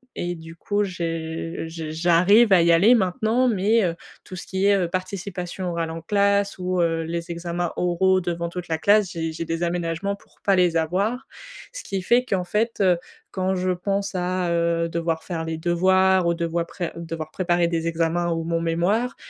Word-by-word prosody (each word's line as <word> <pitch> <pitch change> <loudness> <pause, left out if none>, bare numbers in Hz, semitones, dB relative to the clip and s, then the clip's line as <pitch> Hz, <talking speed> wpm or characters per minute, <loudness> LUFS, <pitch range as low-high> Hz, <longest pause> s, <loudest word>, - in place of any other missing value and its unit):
et 175 0 -3
du 165 0 -11
coup 205 +4 -1
j'ai 165 -2 -4
j 160 -1 -6
j'arrive 180 +7 +4
à 175 - +6
y 170 0 +4
aller 195 +9 +6
maintenant 220 +4 +2
mais, 215 0 +2
heu, 170 -2 0 0.3
tout 185 - -9
ce 180 - -7
qui 190 +1 -1
est, 205 - +5
heu, 175 -2 0
participation 185 0 -4
orale 165 -1 -2
en 165 0 -6
classe 200 +2 +1
ou 185 0 -1
heu, 165 -1 +1
les 170 +1 -4
examens 170 0 -3
oraux 185 +2 +2
devant 170 -1 -3
toute 180 0 -6
la 160 - -1
classe, 205 +2 +3
j'ai 165 -1 -3
j'ai 165 +1 -5
des 165 +1 -2
aménagements 175 +3 -2
pour - - -25
pas 195 -1 +4
les 175 -2 +3
avoir. 200 - -1 0.5
Ce - - -7
qui 195 -1 -3
fait 245 +5 +3
qu'en 190 -7 -1
fait, 220 +5 -1
heu, 180 -3 +4 0.3
quand 190 0 -1
je 185 0 0
pense 195 +3 -2
à, 180 -1 -1
heu, 170 0 +1
devoir 165 -1 -2
faire 165 -3 -4
les 160 0 -4
devoirs 185 +2 +3
ou 170 - +2
devoir 170 0 -1
pré 175 -3 -5
devoir 165 -2 -6
préparer 175 -2 +1
des 165 -1 -1
examens 165 +1 0
ou 165 0 -1
mon 165 0 -1
mémoire, 185 +10 0
175 Hz, 195 wpm, -23 LUFS, 165-190 Hz, 0.5 s, à